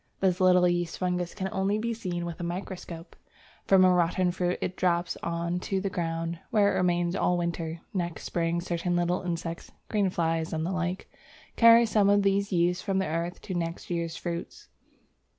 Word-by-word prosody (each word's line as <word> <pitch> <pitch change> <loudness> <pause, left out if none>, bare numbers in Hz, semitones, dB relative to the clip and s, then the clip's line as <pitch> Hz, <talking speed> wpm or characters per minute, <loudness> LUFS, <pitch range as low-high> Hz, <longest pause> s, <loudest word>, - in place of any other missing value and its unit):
This 185 -1 +1
little 180 -1 +5
yeast 175 -1 -1
fungus 180 -1 -2
can 190 -2 -2
only 195 +2 0
be 230 +2 -1
seen 180 -6 -4
with 170 -1 -6
a - - -4
microscope. 175 -1 -6 0.5
From 190 -1 +6
a 185 - +5
rotten 180 +1 +2
fruit 180 0 -1
it 180 - -3
drops 175 -2 +1
on 170 +1 -2
to 190 +1 -2
the 195 0 -3
ground, 165 -1 -3
where 210 -4 +3
it - - 0
remains 175 0 +1
all 180 -2 +1
winter. 170 -1 -3
Next 175 -4 -3
spring 170 0 -1
certain 175 0 -1
small 175 +1 +1
insects 170 -1 -4 0.2
(green 205 -3 +2
fly 165 -2 0
and 160 0 -3
the 180 - -2
like) 180 +1 -2 0.5
carry 230 0 +7
some 210 -2 +3
of 205 0 +4
these 200 +1 +1
yeasts 175 0 +2
from 195 -2 -1
the 190 - +1
earth 170 +2 -3
to 190 - -5
next 170 0 -4
year's 170 -1 -2
fruits. 170 -1 -6
175 Hz, 185 wpm, -28 LUFS, 170-190 Hz, 0.5 s, carry